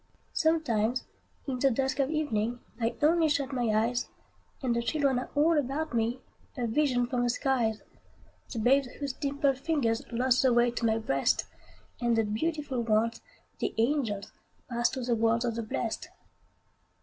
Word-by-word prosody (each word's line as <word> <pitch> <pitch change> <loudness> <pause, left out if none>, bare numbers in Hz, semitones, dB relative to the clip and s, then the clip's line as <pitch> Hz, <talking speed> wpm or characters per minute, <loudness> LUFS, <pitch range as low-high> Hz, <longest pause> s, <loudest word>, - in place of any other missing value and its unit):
Sometimes, 255 -8 +1 0.4
in 260 -3 -3
the 275 - +4
dusk 265 +2 -1
of 275 0 +2
evening, 245 -7 -1 0.2
I 230 0 0
only 320 +1 +4
shut 285 -2 0
my 245 -2 0
eyes, 230 +3 +1 0.6
And 245 -2 +1
the 235 - +1
children 275 0 +1
are 250 - -6
all 310 +2 +4
about 290 +3 -2
me, 235 +2 0 0.4
A 245 - -1
vision 245 0 +2
from 245 0 -1
the 245 - +1
skies: 240 -4 0 0.7
The 240 - -5
babes 265 +4 +3
whose 280 -2 -2
dimpled 280 -1 0
fingers 270 -8 0
Lost 250 +1 +2
the 260 -2 +4
way 240 0 +4
to 235 -1 -1
my 220 0 +2
breast, 135 -12 +1 0.6
And 235 -1 +2
the 225 - +4
beautiful 275 +4 -2
ones, 225 0 +1 0.4
the - - -2
angels, 225 -5 0 0.4
Passed 240 +1 0
to 260 - -3
the 240 0 0
world 230 +1 +2
of 235 - 0
the 230 - -3
blest. 225 0 -3
245 Hz, 165 wpm, -29 LUFS, 230-280 Hz, 0.7 s, the